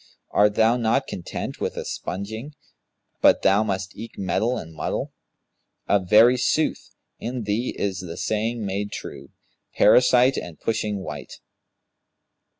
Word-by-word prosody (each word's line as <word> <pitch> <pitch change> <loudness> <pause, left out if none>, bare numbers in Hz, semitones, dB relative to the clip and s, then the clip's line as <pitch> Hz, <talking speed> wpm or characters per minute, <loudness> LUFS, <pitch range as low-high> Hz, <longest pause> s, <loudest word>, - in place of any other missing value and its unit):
Art 105 0 +3
thou 115 +2 +4
not 120 +3 +1
content 85 - -6
with - - -2
sponging, 110 - -5 0.7
but - - +5
thou 95 +2 +4
must 100 -2 -3
eke 115 +2 -9
meddle 100 +6 0
and 80 0 -8
muddle? 80 - -3 0.7
Of 95 -3 +1
very 115 +5 +7
sooth, 130 +5 0 0.3
in 120 0 -4
thee 105 +4 -2
is 95 -2 -2
the 85 -3 -7
saying 110 +1 -1
made 100 +1 -3
true, 70 0 -8 0.5
Parasite 125 +1 +5
and 85 -3 -6
pushing 105 -3 -2
wight.' - - -7
105 Hz, 130 wpm, -24 LUFS, 95-120 Hz, 0.7 s, very